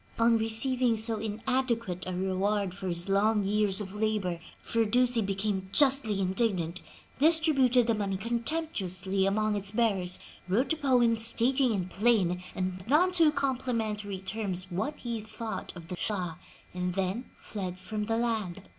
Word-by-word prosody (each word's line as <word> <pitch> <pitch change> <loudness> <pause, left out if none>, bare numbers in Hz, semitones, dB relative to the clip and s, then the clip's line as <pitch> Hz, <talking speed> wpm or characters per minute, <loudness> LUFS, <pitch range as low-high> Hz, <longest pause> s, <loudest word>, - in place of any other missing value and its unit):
On 230 0 +4
receiving 230 +2 +1
so 220 0 -1
inadequate 225 -2 -2
a 185 - -3
reward 190 +1 -1
for 190 0 -6
his 175 0 0
long 205 +2 +2
years 205 0 +1
of 195 -2 -6
labor, 210 -5 -1 0.2
Firdusi 235 +2 +2
became 195 -1 -2
justly 265 -7 +4
indignant, 185 -3 -1 0.4
distributed 280 -6 +4
the 230 - +2
money 200 -3 -2
contemptuously 220 - 0
among 215 +1 +1
its 200 -1 +1
bearers, 200 -5 +1 0.3
wrote 235 - +1
a - - -1
poem 250 -6 +3
stating 235 +3 +3
in 190 -4 -1
plain 190 -4 +1
and 185 0 -3
none 325 +8 +4
too 330 -4 +4
complimentary 230 -8 -2
terms 185 -1 -4
what 285 +12 -2
he 235 -2 -4
thought 220 +1 -6
of 170 -2 -10
the 180 - -5
Shah, 180 -6 -2 0.4
and 180 0 -3
then 195 +6 -2
fled 185 -4 -5
from 210 +3 -4
the 225 +1 -1
land. 215 -6 -2
215 Hz, 145 wpm, -29 LUFS, 190-235 Hz, 0.4 s, On